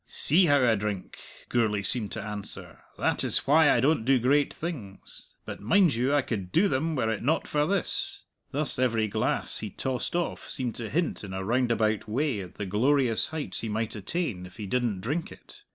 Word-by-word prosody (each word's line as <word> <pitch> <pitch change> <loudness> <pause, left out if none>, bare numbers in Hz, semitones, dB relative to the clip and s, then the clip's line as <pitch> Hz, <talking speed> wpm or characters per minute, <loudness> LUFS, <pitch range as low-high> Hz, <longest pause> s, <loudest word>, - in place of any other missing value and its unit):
"See 175 +5 +4
how 145 -3 +4
I 115 - +4
drink," 105 -3 -4 0.3
Gourlay 105 -4 0
seemed 105 +1 +1
to 110 - -4
answer; 105 -1 -7 0.2
"that - - +1
is - - +2
why 150 +2 +5
I - - +4
don't 140 0 +2
do 135 +3 +4
great 140 +4 +2
things. 130 - -7
But, - - -7
mind 165 - +3
you, 125 +4 0
I 145 -2 +3
could 100 -7 -4
do 195 +5 +4
them 155 +3 -1
were 110 -5 0
it 110 - -3
not 155 +7 0
for 150 0 +1
this." 195 -1 0 0.2
Thus 145 -2 +5
every 115 -4 +1
glass 100 - -1
he 110 - -5
tossed 130 - -3
off 175 -1 -3
seemed 125 -3 -2
to 115 -2 -5
hint 165 -2 -1
in 95 -2 -7
a 95 0 -3
roundabout 115 -2 +1
way 130 0 0
at 90 -3 -9
the 105 - -4
glorious 120 +4 +2
heights 160 -2 -2
he 115 - -4
might 110 +1 -2
attain 105 - -3
if 90 - -17
he 105 - -5
didn't 115 -3 -1
drink 145 - -3
it. - - -14
120 Hz, 200 wpm, -27 LUFS, 105-145 Hz, 0.3 s, why